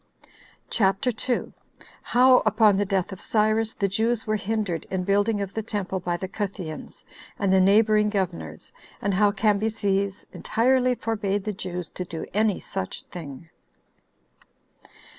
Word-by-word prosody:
CHAPTER 195 +4 +2
2. 245 +2 -2 0.5
How 255 +1 +5
Upon 215 -2 +4
The 205 - +1
Death 190 -2 0
Of 190 - -8
Cyrus 220 0 +1
The 200 - 0
Jews 225 +3 0
Were 215 -1 0
Hindered 205 -5 -2
In 190 -1 -2
Building 205 +2 +1
Of 195 -1 -4
The 220 - -2
Temple 200 -3 -3
By 175 -1 -2
The 190 - -5
Cutheans, 190 -5 -6 0.3
And 195 -2 +1
The 190 - +5
Neighboring 210 +2 +4
Governors; 85 - -4 0.3
And 200 - -1
How 205 +2 +4
Cambyses 205 -1 0
Entirely 255 +2 +2
Forbade 205 -4 -2
The 210 - -3
Jews 180 -3 -5
To 180 - -5
Do 165 -2 -6
Any 210 0 +2
Such 95 - -5
Thing. 160 -2 -9
205 Hz, 140 wpm, -25 LUFS, 190-220 Hz, 0.5 s, How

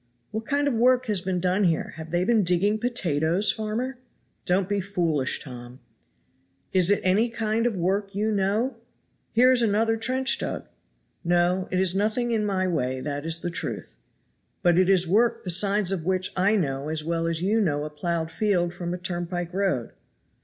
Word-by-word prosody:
"What 220 +1 -5
kind 285 0 +1
of 285 - +1
work 250 +2 +3
has 210 -6 0
been 185 -1 -2
done 185 +3 +1
here? 165 -3 0
have 160 0 -8
they 175 +2 0
been 225 -1 +3
digging 190 +5 +1
potatoes, 180 -6 +1
farmer?" 235 +4 -4 0.5
"Don't 185 +1 +2
be 200 0 -1
foolish, 170 -8 -1
Tom." 125 -1 -10 0.9
"Is 185 -1 +3
it 205 - +3
any 205 +6 +3
kind 225 0 0
of 225 -5 -2
work 195 +3 -1
you 215 +2 0
know? 215 +5 0 0.6
Here 250 +3 +5
is 250 -2 +4
another 225 +1 +2
trench 260 +3 +1
dug." - - -4 0.6
"No! 175 +2 +1
it 185 - -1
is 185 -1 +2
nothing 220 +5 0
in 220 -2 +1
my 195 -2 0
way, 130 -7 -1
that 145 +2 -4
is 165 +1 +1
the 175 - -3
truth." - - -5 0.7
"But 175 -1 +4
it 185 0 +3
is 185 -2 +4
work 220 +6 +2
the 180 - +2
signs 200 +2 +3
of 185 -4 -2
which 185 +1 0
I 195 +4 +3
know 140 -6 -1
as 155 -1 -1
well 165 +1 -1
as 165 0 -2
you 215 +4 +2
know 145 -7 0
a 150 - -6
plowed 160 +1 -3
field 175 -1 0
from 175 0 -4
a - - -5
turnpike 175 -1 -4
road." 185 -11 -1
185 Hz, 190 wpm, -25 LUFS, 170-215 Hz, 0.9 s, Here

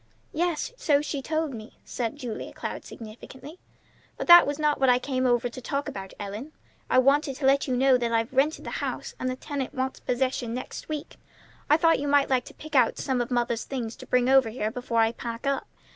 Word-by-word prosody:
"Yes, 345 +6 -1
so 290 -9 +3
she 290 -2 -3
told 310 0 -2
me," 220 -1 -10
said 235 +1 -3
Julia 250 -6 -6
Cloud - - -6
significantly. 260 +8 -11 0.6
"But - - -3
that 345 -3 +9
was 285 0 -2
not 300 -1 +1
what 265 -1 +4
I 245 - +6
came 255 0 -1
over 245 0 +2
to 250 +2 -9
talk 280 +4 -3
about, 195 -9 -6
Ellen; 210 +9 -6 0.4
I - - +3
wanted 275 +2 +3
to 270 - -4
let 275 +2 +3
you 255 -1 0
know 260 0 +4
that 235 -1 -1
I've 230 +2 0
rented 280 +4 +1
the - - -5
house, - - -4
and 255 - -1
the 255 - -2
tenant 275 0 -5
wants 260 0 -2
possession 250 -2 -1
next 255 - -7
week. 305 -2 -5 0.5
I 300 - +6
thought 330 0 +3
you 290 - -3
might 285 -1 +3
like 255 -2 +2
to - - -11
pick 310 0 -11
out 250 -4 +4
some 260 -2 -1
of 240 - -3
mother's 240 -2 0
things 235 -4 -4
to - - -11
bring 250 0 +2
over 265 -3 +5
here 220 -1 -3
before 235 -1 0
I 225 0 +3
pack 235 +1 -6
up. 275 -1 -1
260 Hz, 220 wpm, -26 LUFS, 240-285 Hz, 0.6 s, that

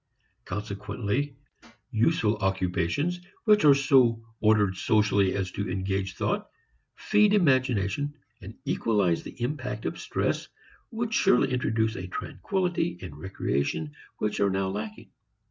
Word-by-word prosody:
Consequently 105 +7 -3 0.6
useful 110 -2 +2
occupations 95 - 0 0.2
which 210 -4 +5
are 145 -2 +8
so 130 -5 +3
ordered 105 -3 +3
socially 100 -1 +2
as 95 -2 -2
to 100 0 -3
engage 95 0 -2
thought, - - -1 0.5
feed 210 0 +3
imagination 130 - +2 0.3
and - - -10
equalize 100 -7 +1
the - - -11
impact 125 -5 -3
of - - -3
stress - - -1 0.4
would 230 0 -3
surely 125 -6 +3
introduce 110 -2 0
a 90 - -5
tranquillity 175 - -2
and 80 -6 -7
recreation 75 -2 -2 0.3
which 105 -1 -2
are 100 - +3
now 95 0 0
lacking. 105 +2 -6
105 Hz, 120 wpm, -27 LUFS, 95-140 Hz, 0.6 s, are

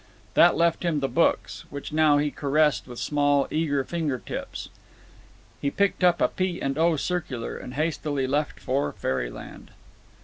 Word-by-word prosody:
That - - +6
left 170 0 +2
him 170 -4 0
the 135 - 0
books, 165 +4 0
which 140 0 -6
he - - -6
now 155 -2 +5
caressed 150 -2 +1
with 120 -1 -9
small 145 0 +2
eager 145 -3 0
finger 155 -4 -2
tips. - - -6 0.9
He 140 - +1
picked 200 +4 0
out 175 -1 +4
a - - +4
P. 185 -2 -2
& 135 +1 -1
O. 165 +1 +3
circular, 150 -7 -3
and 125 - -8
hastily 150 -3 -1
left 145 +3 -1
for 135 +2 -1
fairyland. - - -4
145 Hz, 160 wpm, -26 LUFS, 135-165 Hz, 0.9 s, That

